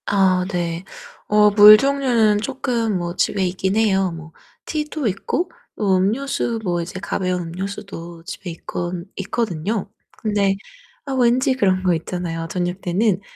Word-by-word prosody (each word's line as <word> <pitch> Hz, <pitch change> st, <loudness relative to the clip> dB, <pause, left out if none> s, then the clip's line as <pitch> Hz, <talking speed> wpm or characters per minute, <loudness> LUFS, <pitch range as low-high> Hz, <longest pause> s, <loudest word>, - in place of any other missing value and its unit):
아, 190 Hz, -2 st, +3 dB
네. 170 Hz, -1 st, -2 dB, 0.4 s
어 210 Hz, 0 st, +5 dB
물 210 Hz, +1 st, +10 dB
종류는 245 Hz, -5 st, +2 dB
쪼끔 235 Hz, -4 st, -1 dB
뭐 175 Hz, 0 st, -4 dB
집에 195 Hz, +1 st, +1 dB
있긴 190 Hz, +2 st, -1 dB
해요. 195 Hz, -4 st, +2 dB
뭐 160 Hz, -1 st, -9 dB, 0.3 s
티도 300 Hz, -3 st, -2 dB
있고 205 Hz, -, -2 dB, 0.3 s
음료수 220 Hz, +5 st, +1 dB
뭐 175 Hz, -3 st, 0 dB
이제 180 Hz, +2 st, -6 dB
가벼운 185 Hz, -2 st, -2 dB
음료수도 175 Hz, -1 st, -7 dB
집에 185 Hz, +1 st, -7 dB
있거 175 Hz, +1 st, -5 dB, 0.2 s
있거든요. 200 Hz, -1 st, -2 dB, 0.3 s
근데 205 Hz, -2 st, +1 dB, 0.6 s
왠지 255 Hz, +3 st, +3 dB
그런 190 Hz, -7 st, +1 dB
거 180 Hz, -1 st, +3 dB
있잖아요. 165 Hz, 0 st, -3 dB
저녁 180 Hz, +1 st, -2 dB
때는 190 Hz, +2 st, +1 dB
195 Hz, 255 characters per minute, -21 LUFS, 180-220 Hz, 0.6 s, 물